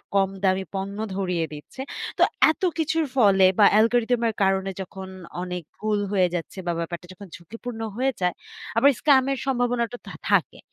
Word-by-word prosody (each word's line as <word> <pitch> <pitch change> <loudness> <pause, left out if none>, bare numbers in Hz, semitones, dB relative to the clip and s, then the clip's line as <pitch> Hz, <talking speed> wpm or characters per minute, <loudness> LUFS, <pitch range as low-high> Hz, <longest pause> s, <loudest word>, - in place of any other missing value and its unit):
কম 195 -1 +3
দামি 190 0 +2
পণ্য 195 +1 -4 0.2
ধরিয়ে 180 -4 -1
দিচ্ছে। 150 - -9 0.4
তো - - +5 0.3
এত - - -10 0.2
কিছুর 320 0 +1
ফলে 195 -5 +5 0.2
বা 205 - +8
অ্যালগরিথম 235 +2 +3
এর - - -3
কারণে 195 0 +1
যখন 190 0 -8 0.4
অনেক 180 -1 -5
ভুল 215 -1 0
হয়ে 185 -3 +3
যাচ্ছে 175 +3 -5
বা - - +2
ব্যাপারটা 170 +1 -5
যখন 200 +1 -12
ঝুঁকিপূর্ণ 225 +6 -8 0.2
হয়ে 265 +1 +2
যায়। 180 -1 +2 0.4
আবার 280 +5 +6
স্কাম 270 -3 +5
এর 270 - -1
সম্ভাবনাটা 245 -2 0
তো - - -9 0.2
থাকে। - - +2
200 Hz, 170 wpm, -24 LUFS, 185-245 Hz, 0.4 s, বা